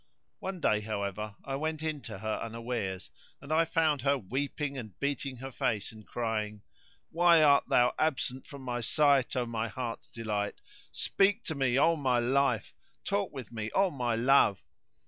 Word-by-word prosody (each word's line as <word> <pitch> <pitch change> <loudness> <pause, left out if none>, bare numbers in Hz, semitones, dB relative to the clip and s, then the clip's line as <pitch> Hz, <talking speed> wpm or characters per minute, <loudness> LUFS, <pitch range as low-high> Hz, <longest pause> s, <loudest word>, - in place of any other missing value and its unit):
One 190 -1 -5
day, 105 -9 +2
however, 105 -1 -4
I 135 - -3
went 155 +1 -3
in 155 -3 -2
to 105 - -6
her 110 +2 -2
unawares; 115 -5 -4 0.3
and 145 +3 -4
I 165 +1 +4
found 160 -3 +1
her 140 +2 +2
weeping 140 +5 -3
and 110 -8 -8
beating 140 -1 -2
her 135 +2 -7
face 105 -4 -1
and 110 -2 -14
crying:—Why 120 +10 0
art 140 -1 +5
thou 125 0 +4
absent 130 -4 0
from 140 -2 -10
my 120 -1 -2
sight, 140 +1 +3
O 125 -1 +1
my 115 -1 -2
heart's 115 +1 -5
delight? 105 -3 -3 0.3
Speak 205 +4 +2
to 160 - -3
me, 135 -3 +1
O 165 +4 +5
my 130 -5 +1
life; 125 -1 +1 0.3
talk 200 -1 -1
with 130 -4 -8
me, 110 -2 -4
O 195 -1 +4
my 120 -4 -1
love? 120 -4 +4
130 Hz, 165 wpm, -30 LUFS, 110-150 Hz, 0.3 s, art